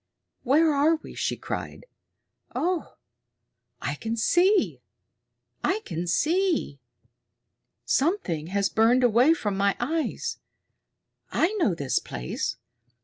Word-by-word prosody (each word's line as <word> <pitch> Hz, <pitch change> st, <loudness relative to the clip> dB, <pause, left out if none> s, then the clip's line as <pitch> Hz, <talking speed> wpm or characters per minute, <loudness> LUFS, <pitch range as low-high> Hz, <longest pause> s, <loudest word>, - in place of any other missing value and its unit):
"Where 300 Hz, +4 st, +3 dB
are 295 Hz, +3 st, +4 dB
we?" 315 Hz, -, -11 dB
she -, -, -1 dB
cried. -, -, -6 dB, 0.7 s
"Oh, 360 Hz, 0 st, -1 dB, 0.8 s
I -, -, -2 dB
can 225 Hz, +1 st, -4 dB
see! 365 Hz, -, +3 dB, 0.8 s
I 405 Hz, +4 st, +1 dB
can 170 Hz, 0 st, -4 dB
see! 325 Hz, -, +1 dB, 1.1 s
Something 175 Hz, -, 0 dB
has 200 Hz, +2 st, +1 dB
burned 235 Hz, +5 st, +3 dB
away 245 Hz, +7 st, +5 dB
from 210 Hz, -10 st, -2 dB
my 200 Hz, 0 st, +1 dB
eyes! 310 Hz, +6 st, -2 dB, 0.9 s
I 350 Hz, +6 st, +2 dB
know 215 Hz, -, +2 dB
this 140 Hz, -5 st, 0 dB
place. -, -, -4 dB
255 Hz, 105 wpm, -26 LUFS, 200-330 Hz, 1.1 s, away